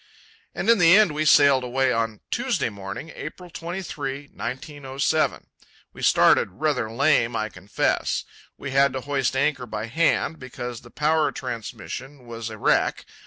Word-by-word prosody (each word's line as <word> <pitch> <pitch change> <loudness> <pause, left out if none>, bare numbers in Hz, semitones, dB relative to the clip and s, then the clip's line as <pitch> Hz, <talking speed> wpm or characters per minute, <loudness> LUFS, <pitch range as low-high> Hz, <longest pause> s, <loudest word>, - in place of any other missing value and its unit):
And - - -3
in 230 -2 +5
the 175 +2 +7
end 215 -6 +5
we 155 +1 -1
sailed 140 -3 +6
away, 130 +1 +1
on 115 -2 -2
Tuesday - - 0
morning, 100 +10 -7
April 175 +4 -8
23, 150 -6 -5
1907. 140 +2 -2 0.5
We - - -11
started 95 - +4
rather 125 -1 -1
lame, 120 -2 +2
I 110 -1 -1
confess. 95 0 -1 0.3
We 140 - -6
had 135 0 +4
to 130 - -3
hoist 135 -2 -1
anchor 135 -2 0
by 110 0 -4
hand, 160 +4 +1
because 125 -2 -7
the 120 - -15
power 150 +1 +1
transmission 125 +3 -7
was 115 -1 -6
a 110 - -8
wreck. - - +1
135 Hz, 150 wpm, -24 LUFS, 115-150 Hz, 0.5 s, the